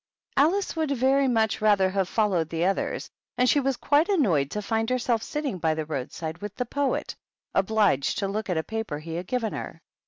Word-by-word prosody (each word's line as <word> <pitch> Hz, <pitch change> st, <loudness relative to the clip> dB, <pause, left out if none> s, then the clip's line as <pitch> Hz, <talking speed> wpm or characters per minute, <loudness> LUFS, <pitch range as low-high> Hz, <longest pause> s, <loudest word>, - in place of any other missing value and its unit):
Alice 350 Hz, +8 st, +2 dB
would 315 Hz, -2 st, 0 dB
very 270 Hz, +1 st, +3 dB
much 225 Hz, -3 st, +1 dB
rather 205 Hz, -3 st, +4 dB
have 190 Hz, -1 st, 0 dB
followed 190 Hz, -8 st, +1 dB
the 165 Hz, +1 st, 0 dB
others, 195 Hz, +1 st, -1 dB, 0.3 s
and 250 Hz, -, +3 dB
she 285 Hz, -, +4 dB
was 270 Hz, -2 st, 0 dB
quite 300 Hz, +6 st, +2 dB
annoyed 185 Hz, -, +2 dB
to 210 Hz, -, -3 dB
find 225 Hz, +2 st, -1 dB
herself 245 Hz, -2 st, +1 dB
sitting 280 Hz, -7 st, -3 dB
by 160 Hz, -1 st, +1 dB
the 155 Hz, -1 st, -3 dB
roadside 160 Hz, +3 st, -5 dB
with 205 Hz, +1 st, -7 dB
the 250 Hz, -, -2 dB
Poet, 280 Hz, +3 st, -1 dB, 0.4 s
obliged 195 Hz, -8 st, +2 dB
to 200 Hz, -, 0 dB
look 205 Hz, +1 st, -3 dB
at 180 Hz, -, 0 dB
a 160 Hz, -, 0 dB
paper 220 Hz, -8 st, -4 dB
he 160 Hz, +2 st, -7 dB
had 175 Hz, +2 st, -4 dB
given 245 Hz, -4 st, -1 dB
her. -, -, -6 dB
215 Hz, 205 wpm, -26 LUFS, 175-255 Hz, 0.4 s, rather